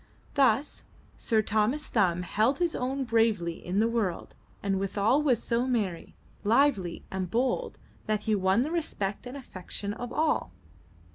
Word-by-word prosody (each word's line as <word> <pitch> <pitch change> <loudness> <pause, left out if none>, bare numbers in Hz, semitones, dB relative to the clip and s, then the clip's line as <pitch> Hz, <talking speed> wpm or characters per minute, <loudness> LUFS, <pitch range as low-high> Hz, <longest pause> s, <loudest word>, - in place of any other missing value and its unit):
Thus 275 0 +2 0.3
Sir 220 -1 +1
Thomas 220 +9 +1
Thumb 180 -5 +1
held 220 +9 +1
his 345 -2 +1
own 265 +2 -1
bravely 225 -8 +1
in 185 +3 -1
the 225 - +4
world 225 -6 -2 0.3
and 195 -1 0
withal 205 +7 +2
was 260 -7 +2
so 235 +2 0
merry, 205 -9 -2 0.3
lively 215 -6 +2
and 190 -2 -3
bold, 260 - 0 0.3
that 215 -1 0
he 220 0 0
won 195 +3 +3
the 305 - -3
respect 225 - -2
and 255 +3 -7
affection 200 -4 -6
of 245 +2 -6
all. 305 - 0
220 Hz, 150 wpm, -28 LUFS, 195-260 Hz, 0.3 s, the